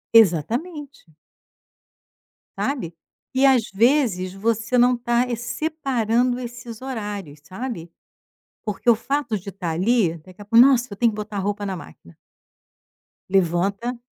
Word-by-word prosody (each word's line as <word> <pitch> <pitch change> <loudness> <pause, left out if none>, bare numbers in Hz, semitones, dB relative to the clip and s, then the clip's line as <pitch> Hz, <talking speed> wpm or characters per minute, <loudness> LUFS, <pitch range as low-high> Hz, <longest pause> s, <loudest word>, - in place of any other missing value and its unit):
Exatamente. 235 - +2 1.5
Sabe. 180 - -2 0.4
E 265 +1 +3
às 255 -4 +4
vezes 220 -5 +2
você 225 +4 0
não 245 +1 +5
tá 240 0 +1
é 240 - -1
separando 245 -3 0
esses 240 -1 -8
horários, 205 - -5
sabe. 185 - -6 0.7
Porque 210 +2 -1
o 235 - +7
fato 245 -1 -1
de 195 +1 -8
estar 185 -4 -4
ali, 180 0 +2
daqui 185 +5 -16
a - - -10
pouco: 230 +4 +7
"Nossa, 255 -3 +3
eu - - -5
tenho 235 +1 +3
que - - -8
botar 210 0 -6
a - - 0
roupa 205 +1 -2
na 195 -1 -3
máquina". 85 - -13 1.1
Levanta, 195 +6 +1
225 Hz, 135 wpm, -23 LUFS, 190-245 Hz, 1.5 s, o